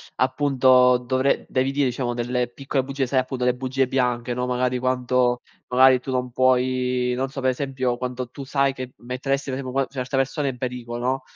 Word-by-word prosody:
appunto 130 Hz, -2 st, +4 dB
dovre 130 Hz, +2 st, 0 dB
devi 130 Hz, +1 st, 0 dB
dire 140 Hz, 0 st, +1 dB
diciamo 120 Hz, -1 st, -2 dB
delle 125 Hz, +1 st, -1 dB
piccole 135 Hz, +2 st, -2 dB
bugie, 135 Hz, 0 st, -2 dB
sai 130 Hz, +1 st, +1 dB
appunto 130 Hz, -1 st, -2 dB
le 125 Hz, -, +3 dB
bugie 130 Hz, +1 st, -1 dB
bianche, 125 Hz, -2 st, 0 dB
no, 125 Hz, +1 st, -2 dB
magari 125 Hz, 0 st, 0 dB
quanto 125 Hz, -1 st, +1 dB, 0.3 s
magari 130 Hz, 0 st, +5 dB
tu 130 Hz, -, -10 dB
non 125 Hz, -1 st, -1 dB
puoi, 125 Hz, 0 st, +1 dB
non 130 Hz, +1 st, -2 dB
so 135 Hz, 0 st, -6 dB
per 130 Hz, 0 st, +2 dB
esempio, 130 Hz, -2 st, -2 dB
quando 125 Hz, 0 st, -4 dB
tu 140 Hz, -, -8 dB
sai 135 Hz, 0 st, +1 dB
che 130 Hz, -1 st, -7 dB
metteresti 135 Hz, +3 st, -3 dB
per 130 Hz, -, -3 dB
esempio 130 Hz, -2 st, -5 dB
qua -, -, -4 dB
certe 130 Hz, -1 st, -4 dB
persone 135 Hz, +2 st, 0 dB
in 125 Hz, -, -6 dB
pericolo, 125 Hz, -1 st, -5 dB
no, 130 Hz, +1 st, 0 dB
130 Hz, 195 wpm, -23 LUFS, 125-135 Hz, 0.3 s, magari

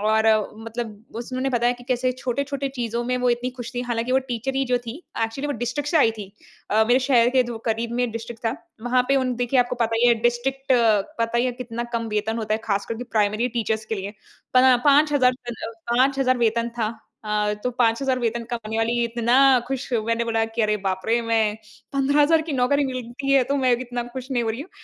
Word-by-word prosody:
और 220 Hz, +1 st, +2 dB, 0.3 s
मतलब 225 Hz, +1 st, -5 dB, 0.3 s
उस 235 Hz, +2 st, -6 dB
उन्होंने 260 Hz, +1 st, -1 dB
बताया 240 Hz, -1 st, +2 dB
कि 245 Hz, -, -13 dB
कैसे 255 Hz, 0 st, +1 dB
छोटे-छोटे 280 Hz, +2 st, -2 dB
चीज़ों 235 Hz, -1 st, -2 dB
में 250 Hz, +1 st, 0 dB
वो 250 Hz, 0 st, +2 dB
इतनी 240 Hz, +1 st, -1 dB
ख़ुश 240 Hz, -1 st, -6 dB
थी। 245 Hz, -, -1 dB
हालाँकि 240 Hz, 0 st, -2 dB
वो 265 Hz, -, +5 dB
टीचर 245 Hz, +3 st, -3 dB
ही 270 Hz, -, +2 dB
जो 250 Hz, -1 st, +1 dB
थी 230 Hz, -, -5 dB, 0.3 s
एक्चुअली 270 Hz, +6 st, -4 dB
वो -, -, 0 dB
डिस्ट्रिक्ट 290 Hz, +4 st, -2 dB
से 330 Hz, -, +2 dB
आई 225 Hz, -, +5 dB
थी। 205 Hz, -, -5 dB, 0.5 s
अ, 220 Hz, +1 st, +4 dB
मेरे 250 Hz, +2 st, +4 dB
शहर 240 Hz, -3 st, +5 dB
के 260 Hz, -1 st, +4 dB
जो 230 Hz, -2 st, -5 dB
क़रीब 230 Hz, +1 st, -1 dB
में 245 Hz, -2 st, 0 dB
डिस्ट्रिक्ट 230 Hz, 0 st, -7 dB
था। 225 Hz, -, +1 dB, 0.3 s
वहाँ 250 Hz, +1 st, +2 dB
पे 275 Hz, -, +4 dB
उन 255 Hz, -2 st, 0 dB
देखिए 245 Hz, +1 st, +1 dB
आपको 245 Hz, 0 st, -1 dB
पता 225 Hz, 0 st, 0 dB
ही -, -, +6 dB
है 235 Hz, -, +6 dB
डिस्ट्रिक्ट 265 Hz, +3 st, 0 dB, 0.5 s
पता 230 Hz, +1 st, +1 dB
ही 245 Hz, -, +2 dB
है 250 Hz, -, -1 dB
कितना 240 Hz, -1 st, -5 dB
कम 230 Hz, -1 st, -1 dB
वेतन 215 Hz, +1 st, -1 dB
होता 215 Hz, -1 st, -1 dB
है -, -, -1 dB
ख़ास 200 Hz, -1 st, -1 dB
करके 230 Hz, +2 st, -5 dB
प्राइमरी 215 Hz, +4 st, +2 dB
टीचर्स 220 Hz, -1 st, -1 dB
के 220 Hz, -, -2 dB
लिए। 195 Hz, 0 st, -5 dB, 0.4 s
पन 255 Hz, 0 st, +6 dB
5000 285 Hz, -3 st, +5 dB, 0.2 s
पन 240 Hz, -, -3 dB, 0.4 s
5000 260 Hz, 0 st, +2 dB
वेतन 235 Hz, 0 st, +1 dB
था। 220 Hz, -, +1 dB, 0.4 s
अ, 210 Hz, 0 st, 0 dB
तो 250 Hz, -, +1 dB
5000 250 Hz, +2 st, +1 dB
वेतन 235 Hz, 0 st, -1 dB
कमाने 220 Hz, -1 st, -4 dB
वाली 235 Hz, +1 st, +1 dB
इतना 235 Hz, +2 st, +2 dB, 0.3 s
ख़ुश 265 Hz, -1 st, -4 dB
मैंने 230 Hz, +1 st, 0 dB
बोला 225 Hz, -1 st, +1 dB
कि 230 Hz, -, +2 dB
"अरे! 210 Hz, 0 st, +2 dB
बाप 190 Hz, 0 st, 0 dB
रे 235 Hz, +1 st, +2 dB
मैं 220 Hz, -2 st, +1 dB, 0.4 s
15000 290 Hz, +4 st, +3 dB
की 310 Hz, -2 st, -5 dB
नौकरी 275 Hz, +2 st, +2 dB
मिलती 255 Hz, +2 st, -3 dB
है 265 Hz, -2 st, +5 dB
तो -, -, +2 dB
मैं 250 Hz, -, +5 dB
इतना 245 Hz, -1 st, -4 dB
ख़ुश 260 Hz, +1 st, -7 dB
नहीं 245 Hz, -2 st, +1 dB
हो 225 Hz, -, -1 dB
रही 230 Hz, +5 st, -5 dB
हूँ, 335 Hz, -, -9 dB
240 Hz, 220 wpm, -23 LUFS, 225-255 Hz, 0.5 s, ही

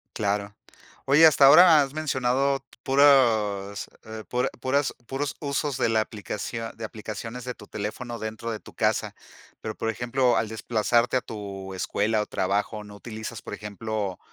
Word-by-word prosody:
Claro. 100 Hz, -1 st, -1 dB, 0.5 s
Oye, 150 Hz, +4 st, +7 dB
hasta 145 Hz, -3 st, +7 dB
ahora 155 Hz, +2 st, +8 dB
has 135 Hz, 0 st, -2 dB
mencionado 135 Hz, -2 st, 0 dB, 0.2 s
puros 110 Hz, -8 st, +3 dB
eh, 110 Hz, 0 st, -8 dB
pura 125 Hz, 0 st, 0 dB
puras 135 Hz, 0 st, 0 dB
puros 140 Hz, +2 st, -3 dB
usos 140 Hz, -1 st, -2 dB
de -, -, +2 dB
la 110 Hz, -1 st, +3 dB
aplicación 110 Hz, +2 st, -5 dB
de 115 Hz, -, -8 dB
aplicaciones 110 Hz, +3 st, -7 dB
de 125 Hz, -, -3 dB
tu 105 Hz, -, -13 dB
teléfono 115 Hz, +3 st, -5 dB
dentro 110 Hz, +1 st, -5 dB
de 110 Hz, -, -4 dB
tu -, -, -15 dB
casa. -, -, 0 dB, 0.5 s
Pero, 110 Hz, -, -4 dB
por 115 Hz, -, -2 dB
ejemplo, 120 Hz, +3 st, +1 dB
al 110 Hz, -, 0 dB
desplazarte 115 Hz, +2 st, +1 dB
a 125 Hz, -, -1 dB
tu 100 Hz, -3 st, -7 dB
escuela 105 Hz, +3 st, 0 dB
o -, -, -2 dB
trabajo, 105 Hz, +3 st, -1 dB
¿no 105 Hz, 0 st, -12 dB
utilizas, 110 Hz, +1 st, -7 dB
por -, -, -8 dB
ejemplo, 105 Hz, -1 st, -4 dB
115 Hz, 160 wpm, -26 LUFS, 105-130 Hz, 0.5 s, ahora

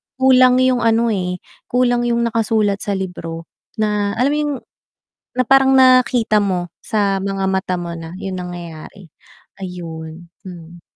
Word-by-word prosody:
kulang 255 Hz, -1 st, +5 dB
yung 255 Hz, -1 st, +2 dB
ano, 230 Hz, 0 st, +2 dB
eh, 180 Hz, -3 st, -3 dB, 0.2 s
kulang 245 Hz, -1 st, +1 dB
yung 235 Hz, 0 st, +1 dB
nakasulat 220 Hz, -3 st, 0 dB
sa 200 Hz, -1 st, -2 dB
libro, 165 Hz, -3 st, -5 dB, 0.3 s
na 210 Hz, -2 st, -1 dB
alam 255 Hz, +5 st, +1 dB
mo 300 Hz, -, 0 dB
yung 295 Hz, -1 st, -1 dB, 0.9 s
na 255 Hz, -, +2 dB
parang 270 Hz, +1 st, +5 dB
nakita 250 Hz, -4 st, +4 dB
mo 180 Hz, -3 st, -1 dB, 0.2 s
sa 200 Hz, -3 st, 0 dB
mga 195 Hz, 0 st, -2 dB
mata 190 Hz, -1 st, -1 dB
mo 170 Hz, -1 st, -5 dB
na 165 Hz, -1 st, -8 dB
yung 190 Hz, -1 st, -5 dB
nangyayari. 175 Hz, 0 st, -8 dB, 0.6 s
Ayun, 165 Hz, -2 st, -8 dB, 0.2 s
hmm. 175 Hz, -2 st, -11 dB
200 Hz, 140 wpm, -18 LUFS, 180-240 Hz, 0.9 s, kulang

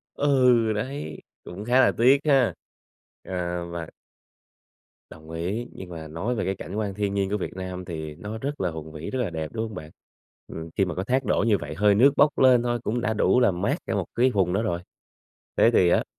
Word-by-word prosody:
Ừ, 125 Hz, -5 st, +3 dB
đấy, 110 Hz, -, -4 dB, 0.3 s
cũng 95 Hz, +4 st, -8 dB
khá 125 Hz, +3 st, +4 dB
là -, -, +5 dB
tiếc 130 Hz, +4 st, +6 dB
ha. 135 Hz, -5 st, +4 dB, 0.7 s
À, 90 Hz, -1 st, -3 dB
và 85 Hz, -2 st, -5 dB, 1.2 s
Đồng 80 Hz, 0 st, -13 dB
ý, 95 Hz, +9 st, -3 dB
nhưng 95 Hz, -, -9 dB
mà 80 Hz, -2 st, -7 dB
nói 95 Hz, +11 st, -2 dB
về 115 Hz, -, -2 dB
cái 95 Hz, +2 st, -1 dB
cảnh 95 Hz, -, -8 dB
quan 105 Hz, -3 st, -2 dB
thiên 100 Hz, 0 st, -2 dB
nhiên 100 Hz, -1 st, 0 dB
của 105 Hz, -, +1 dB
Việt 95 Hz, -, -5 dB
Nam 90 Hz, -1 st, -5 dB
thì 80 Hz, -4 st, -6 dB
nó 105 Hz, +7 st, -7 dB
rất 140 Hz, +5 st, -4 dB
là 90 Hz, -2 st, 0 dB
hùng 80 Hz, -1 st, -8 dB
vĩ, 80 Hz, 0 st, -6 dB
rất 130 Hz, -, -3 dB
là 120 Hz, -7 st, -1 dB
đẹp, 80 Hz, -2 st, -4 dB
đúng 115 Hz, 0 st, -2 dB
hông 110 Hz, -1 st, -7 dB
bạn? 80 Hz, -4 st, -8 dB, 0.6 s
Ừm, 80 Hz, 0 st, -8 dB
khi 100 Hz, -, +3 dB
mà 90 Hz, -3 st, -4 dB
có 95 Hz, -, -3 dB
thác 130 Hz, +4 st, +1 dB
đổ -, -, +1 dB
như 105 Hz, -3 st, +3 dB
vậy, 75 Hz, -1 st, -6 dB
hơi 105 Hz, +3 st, +4 dB
nước 130 Hz, +7 st, +6 dB
bốc 150 Hz, -1 st, +4 dB
lên 130 Hz, -2 st, +6 dB
thôi 120 Hz, 0 st, 0 dB
cũng 120 Hz, +2 st, -1 dB
đã 110 Hz, -2 st, 0 dB
đủ 115 Hz, +3 st, +3 dB
làm 95 Hz, -7 st, +2 dB
mát 100 Hz, -, +1 dB
cả -, -, -2 dB
một -, -, -1 dB
cái 125 Hz, +2 st, +3 dB
vùng 95 Hz, -6 st, +1 dB
đó 100 Hz, +4 st, +1 dB
rồi. 90 Hz, -6 st, -1 dB, 0.8 s
Thế 115 Hz, -, +5 dB
thì 90 Hz, -6 st, +5 dB
á -, -, +3 dB
100 Hz, 230 wpm, -25 LUFS, 85-120 Hz, 1.2 s, tiếc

